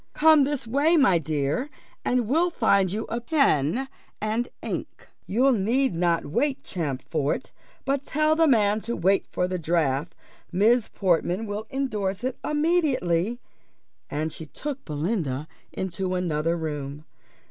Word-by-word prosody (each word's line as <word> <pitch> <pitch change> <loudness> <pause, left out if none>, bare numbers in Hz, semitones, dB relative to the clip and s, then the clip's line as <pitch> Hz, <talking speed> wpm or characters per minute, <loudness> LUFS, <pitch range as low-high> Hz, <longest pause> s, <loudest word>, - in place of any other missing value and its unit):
"Come 310 -2 +6
this 285 -3 -3
way, 285 +8 +3
my 225 - +5
dear, 155 - -1 0.3
and 245 -3 +1
we'll 330 +8 +3
find 200 - +2
you 215 +3 -2
a 235 +1 -3
pen 250 - +2 0.3
and 220 +3 -1
ink. - - -5 0.2
You 255 +6 +3
need 240 +3 +1
not 170 -1 +1
wait, 265 - -1
Champfort; 145 -2 -2 0.3
but 275 0 0
tell 310 +2 +2
the 325 0 +4
man 215 -5 +3
to 235 +2 -3
wait 190 +3 +2
for 180 - 0
the 185 0 -3
draft 160 -2 0 0.4
Miss 220 +5 +3
Portman 185 +2 0
will 210 +1 -5
endorse 215 -7 -2
it 255 0 -2
immediately." 280 - +1 0.7
And 155 +2 -2
she 160 - -8
took 280 - -6
Belinda 150 - -2 0.2
into 185 0 -3
another 165 -2 0
room. 150 -2 -5
205 Hz, 135 wpm, -25 LUFS, 165-265 Hz, 0.7 s, Come